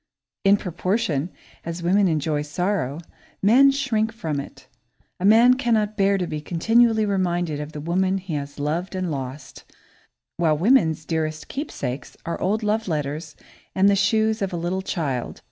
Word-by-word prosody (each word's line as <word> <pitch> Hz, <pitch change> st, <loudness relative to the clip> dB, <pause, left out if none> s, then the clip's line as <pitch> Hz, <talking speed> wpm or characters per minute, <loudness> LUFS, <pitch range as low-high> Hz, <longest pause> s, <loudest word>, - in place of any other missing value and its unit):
In 200 Hz, 0 st, +5 dB
proportion 180 Hz, -4 st, -1 dB, 0.3 s
as 170 Hz, +1 st, -5 dB
women 190 Hz, +3 st, +3 dB
enjoy 155 Hz, -2 st, 0 dB
sorrow, 160 Hz, -1 st, -2 dB, 0.4 s
men 255 Hz, +7 st, +6 dB
shrink 235 Hz, -6 st, 0 dB
from 160 Hz, -11 st, -3 dB
it. 140 Hz, -, -10 dB, 0.5 s
A 180 Hz, -, -1 dB
man 230 Hz, +4 st, +7 dB
cannot 225 Hz, -5 st, 0 dB
bear 200 Hz, -1 st, +3 dB
to 180 Hz, -, -1 dB
be 155 Hz, -3 st, -5 dB
continually 225 Hz, +7 st, +3 dB
reminded 175 Hz, -6 st, -1 dB
of 150 Hz, +1 st, -6 dB
the 150 Hz, -, -6 dB
woman 185 Hz, +4 st, +1 dB
he 190 Hz, -3 st, -6 dB
has 140 Hz, -1 st, -5 dB
loved 160 Hz, +6 st, -2 dB
and 185 Hz, -2 st, -2 dB
lost, 135 Hz, 0 st, -6 dB, 0.7 s
while 160 Hz, -3 st, +2 dB
woman's 165 Hz, -, +3 dB
dearest 155 Hz, -2 st, -2 dB
keepsakes 140 Hz, -, -5 dB
are 170 Hz, -, -4 dB
old 215 Hz, +4 st, 0 dB
love 215 Hz, +1 st, 0 dB
letters 150 Hz, -1 st, -3 dB, 0.4 s
and 190 Hz, +1 st, +4 dB
the 200 Hz, -, +5 dB
shoes 220 Hz, +2 st, +2 dB
of 195 Hz, -1 st, -1 dB
a 175 Hz, -, -3 dB
little 175 Hz, +3 st, -2 dB
child. 140 Hz, -10 st, -3 dB
180 Hz, 160 wpm, -23 LUFS, 155-210 Hz, 0.7 s, man